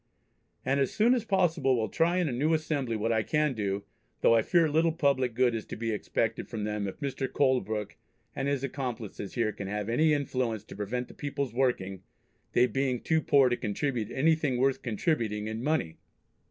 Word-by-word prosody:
And 135 +2 +2
as 135 - +1
soon 230 +4 +4
as 240 -3 0
possible 165 - +2
will 110 -1 0
try 165 - +1
in 180 -3 +1
a - - -1
new 150 +7 +2
Assembly 145 -6 -1
what 110 +2 0
I 110 -1 +2
can 150 +4 +1
do, 100 -3 -2 0.4
though - - +5
I 115 - +5
fear 170 +6 +3
little 160 +2 +2
public 135 -7 +1
good 125 -1 +3
is 110 -2 -3
to - - -6
be 115 +1 -2
expected 105 - -2
from 110 -2 -4
them 105 -1 -2
if 95 - -8
Mr. 135 -2 -3
Colebrooke 110 -7 0 0.4
and 135 - -2
his 140 -2 0
accomplices 120 -7 -5
here 115 -3 +1
can 100 - -7
have 105 +1 -3
any 155 +7 +3
influence 130 -7 -1
to - - -11
prevent 115 +5 -3
the - - -13
peoples 140 -4 -3
working, 110 -8 0 0.5
they 120 - +5
being 130 -1 0
too 160 +5 +1
poor 140 -4 +5
to 120 - +1
contribute 115 +1 -2
anything 150 -2 +2
worth 135 +1 +1
contributing 110 - -1
in 110 +2 -4
money." 140 - 0
125 Hz, 195 wpm, -29 LUFS, 110-145 Hz, 0.5 s, though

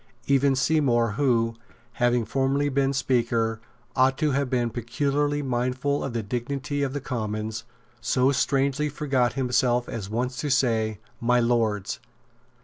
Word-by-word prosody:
Even 140 0 +3
Seymour, 130 -5 +2
who, 115 -2 +1 0.4
having 120 -1 +1
formerly 135 +5 +1
been 135 0 +1
Speaker, 120 -4 0 0.3
ought 130 0 +3
to 155 -2 +1
have 140 0 0
been 120 -2 0
peculiarly 140 +5 -1
mindful 130 +2 -1
of 135 - -4
the 115 -2 -2
dignity 140 +6 -3
of 135 -2 -1
the 145 - -2
Commons, 110 -3 -4 0.4
so 130 +2 +2
strangely 140 +2 +1
forgot 135 -5 0
himself 125 -1 +1
as 110 -6 -5
once 125 +3 -2
to 145 - -2
say 115 -5 +1 0.2
"My 120 +1 +3
Lords." 110 - 0
125 Hz, 140 wpm, -25 LUFS, 115-140 Hz, 0.4 s, Even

